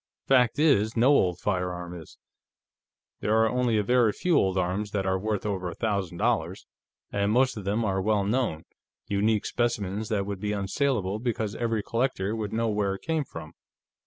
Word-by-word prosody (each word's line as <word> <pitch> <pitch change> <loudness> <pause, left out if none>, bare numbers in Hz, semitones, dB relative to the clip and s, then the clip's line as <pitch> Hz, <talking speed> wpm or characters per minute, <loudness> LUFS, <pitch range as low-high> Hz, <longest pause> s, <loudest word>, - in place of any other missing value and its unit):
Fact 125 -4 +3
is, 120 -8 +3
no 120 +4 +5
old 90 -12 +3
firearm 90 -2 -2
is. 85 -3 -11 1.0
There 105 - +1
are 110 0 +4
only 125 -1 +1
a 105 - +2
very 120 0 +3
few 180 -2 +1
old 95 -7 +2
arms 95 +3 -1
that 100 -2 -1
are 95 0 +1
worth 105 0 -2
over 95 -3 -2
a 85 - -8
thousand 100 -6 -2
dollars, - - -1 0.5
and 100 0 0
most 130 +3 +3
of 105 -3 -7
them 105 +3 0
are 95 -2 0
well 105 0 +1
known, 105 -7 -1 0.4
unique 105 +1 +1
specimens 110 -3 -1
that 100 -3 0
would 100 -1 -4
be 105 +1 -2
unsaleable 100 0 -1
because 110 -4 -2
every 115 -2 -1
collector 115 -4 -1
would 105 -2 -4
know 115 +1 0
where 100 -2 0
it - - -12
came 160 -2 0
from." 80 -7 -9
105 Hz, 185 wpm, -27 LUFS, 95-115 Hz, 1.0 s, no